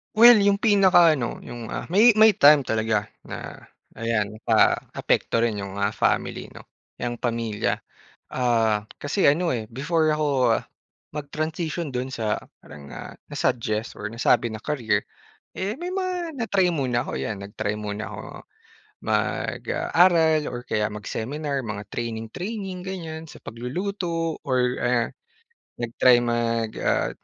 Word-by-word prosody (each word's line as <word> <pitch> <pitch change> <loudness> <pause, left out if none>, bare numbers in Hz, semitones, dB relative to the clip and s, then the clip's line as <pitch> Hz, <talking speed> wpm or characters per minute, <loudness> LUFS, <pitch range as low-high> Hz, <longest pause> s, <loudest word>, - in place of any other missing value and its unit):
Well, 235 0 +9
yung 200 0 +4
pinaka 190 -6 +6
ano, 120 -2 -4
yung 120 -2 -8
ah - - -4
may 215 +4 +6
may 220 0 +7
time 145 -4 +6
talaga 110 -3 0 0.2
na - - -7 0.4
ayan 110 -2 -1
paapekto 115 - +2
rin 110 -3 0
yung 100 -1 -6
ah 100 +1 0
family - - -1
'no, - - -12 0.3
yung 120 -1 -4
pamilya. 115 -3 -1 0.5
Ah, 115 -4 +1 0.2
kasi 145 +7 0
ano 165 +5 +3
eh, 115 -3 -2
before 155 +5 0
ako 140 -6 +2 0.5
mag-transition 155 +2 -3
dun 130 +1 -3
sa 110 -3 -1 0.2
parang 70 -1 -12
ah, - - -8 0.2
na-suggest 115 -3 -2
or 105 - -3
nasabi 115 +1 +2
na 110 - -7
career, 125 -7 0 0.5
eh, 200 +3 -2
may 350 +5 -5
mga 360 -5 -3
na-try 195 -5 +2
muna 125 -6 0
ako, - - -6
ayan 105 -3 -4
nag-try 105 0 -3
muna 105 0 -4
ako - - -7 0.8
mag - - -1
ah, - - -2
aral 165 -3 +5
or 120 - -4
kaya 105 0 0
mag-seminar, 135 +7 -4
mga 105 -1 -5
training 115 -1 -4
training 195 -1 -5
ganyan 165 -4 -6
sa - - -12
pagluluto 165 - -3
or 130 -2 +2 0.2
ah, 125 -1 +2 0.7
nag-try 120 +1 +4
mag 115 -1 0
ah, - - +1
130 Hz, 140 wpm, -24 LUFS, 115-175 Hz, 0.8 s, Well